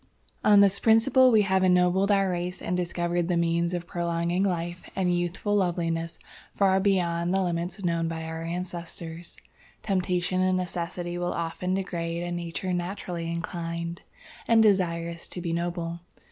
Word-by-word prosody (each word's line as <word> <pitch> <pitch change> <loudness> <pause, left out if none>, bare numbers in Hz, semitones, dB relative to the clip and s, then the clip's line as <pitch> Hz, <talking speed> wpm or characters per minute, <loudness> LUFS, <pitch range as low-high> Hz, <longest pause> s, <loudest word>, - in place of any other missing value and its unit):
"On 205 -1 +7
this 200 -1 +4
principle 245 +4 +5
we 220 -3 +5
have 190 -1 +2
ennobled 180 +2 +3
our 195 -2 +3
race 180 +1 -3
and 180 - -2
discovered 175 -1 -1
the 175 -1 +1
means 170 0 +1
of 175 0 -4
prolonging 170 +1 -1
life 175 -2 -2
and 180 -2 +1
youthful 175 +4 -1
loveliness 165 -3 -1 0.4
far 190 -1 +3
beyond 175 -3 +1
the 190 0 +2
limits 175 +2 -3
known 170 -1 +1
by 165 0 -4
our 160 0 -5
ancestors. 170 -1 -6 0.5
"Temptation 185 -1 0
and 185 0 +2
necessity 175 -1 -3
will 175 0 -1
often 170 +2 -2
degrade 170 -3 -3
a 175 - -4
nature 175 +1 -3
naturally 175 -1 -3
inclined 170 0 -4 0.5
and 225 -1 +6
desirous 170 -4 +1
to - - -7
be 170 -1 -2
noble. 170 0 -3
175 Hz, 150 wpm, -27 LUFS, 170-185 Hz, 0.5 s, On